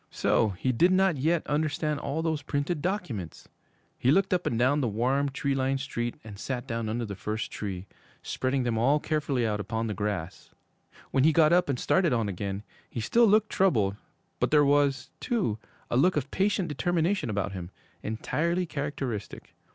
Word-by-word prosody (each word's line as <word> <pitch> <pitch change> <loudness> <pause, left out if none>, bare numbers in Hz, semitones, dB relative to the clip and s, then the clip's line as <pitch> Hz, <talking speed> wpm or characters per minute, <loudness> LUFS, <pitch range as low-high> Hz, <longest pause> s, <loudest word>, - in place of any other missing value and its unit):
So 110 - +2
he 130 - 0
did 170 +10 +4
not 185 -3 +3
yet 160 +5 +1
understand 150 0 0
all 155 +4 -2
those 160 -3 -1
printed 145 +2 -2
documents! 145 - -4 0.5
He 125 - +2
looked 190 +6 +3
up 180 - 0
and 115 - 0
down 135 +5 +3
the 125 - +1
warm, 130 +6 +1
tree 140 +1 -1
lined 135 0 0
street, 120 -3 -3
and 105 -3 -10
sat 125 0 -3
down 115 -3 -3
under 115 +2 -2
the 100 -2 -6
first 105 +3 -4
tree, 95 -3 -5 0.4
spreading 130 0 -1
them 115 -2 0
all 140 +6 +3
carefully 145 -6 0
out 105 -2 -1
upon 110 +3 -2
the 110 - -2
grass. 100 -4 -4 0.6
When 135 - +3
he 160 - +6
got 155 +1 +5
up 175 -3 +3
and 130 -3 0
started 180 -7 +2
on 115 -3 +1
again, 100 +1 -4 0.3
he - - -5
still 230 - +4
looked 215 +1 +3
troubled, 110 - +2 0.4
but - - +1
there 150 -1 +5
was, 140 -2 +2
too, 190 - -1 0.3
a 120 - +2
look 180 +5 +4
of 140 -1 -2
patient 195 -1 +1
determination 170 - 0
about 100 -1 -1
him 90 -3 -6 0.3
entirely 170 +11 -1
characteristic. 140 - -5
135 Hz, 180 wpm, -28 LUFS, 110-160 Hz, 0.6 s, he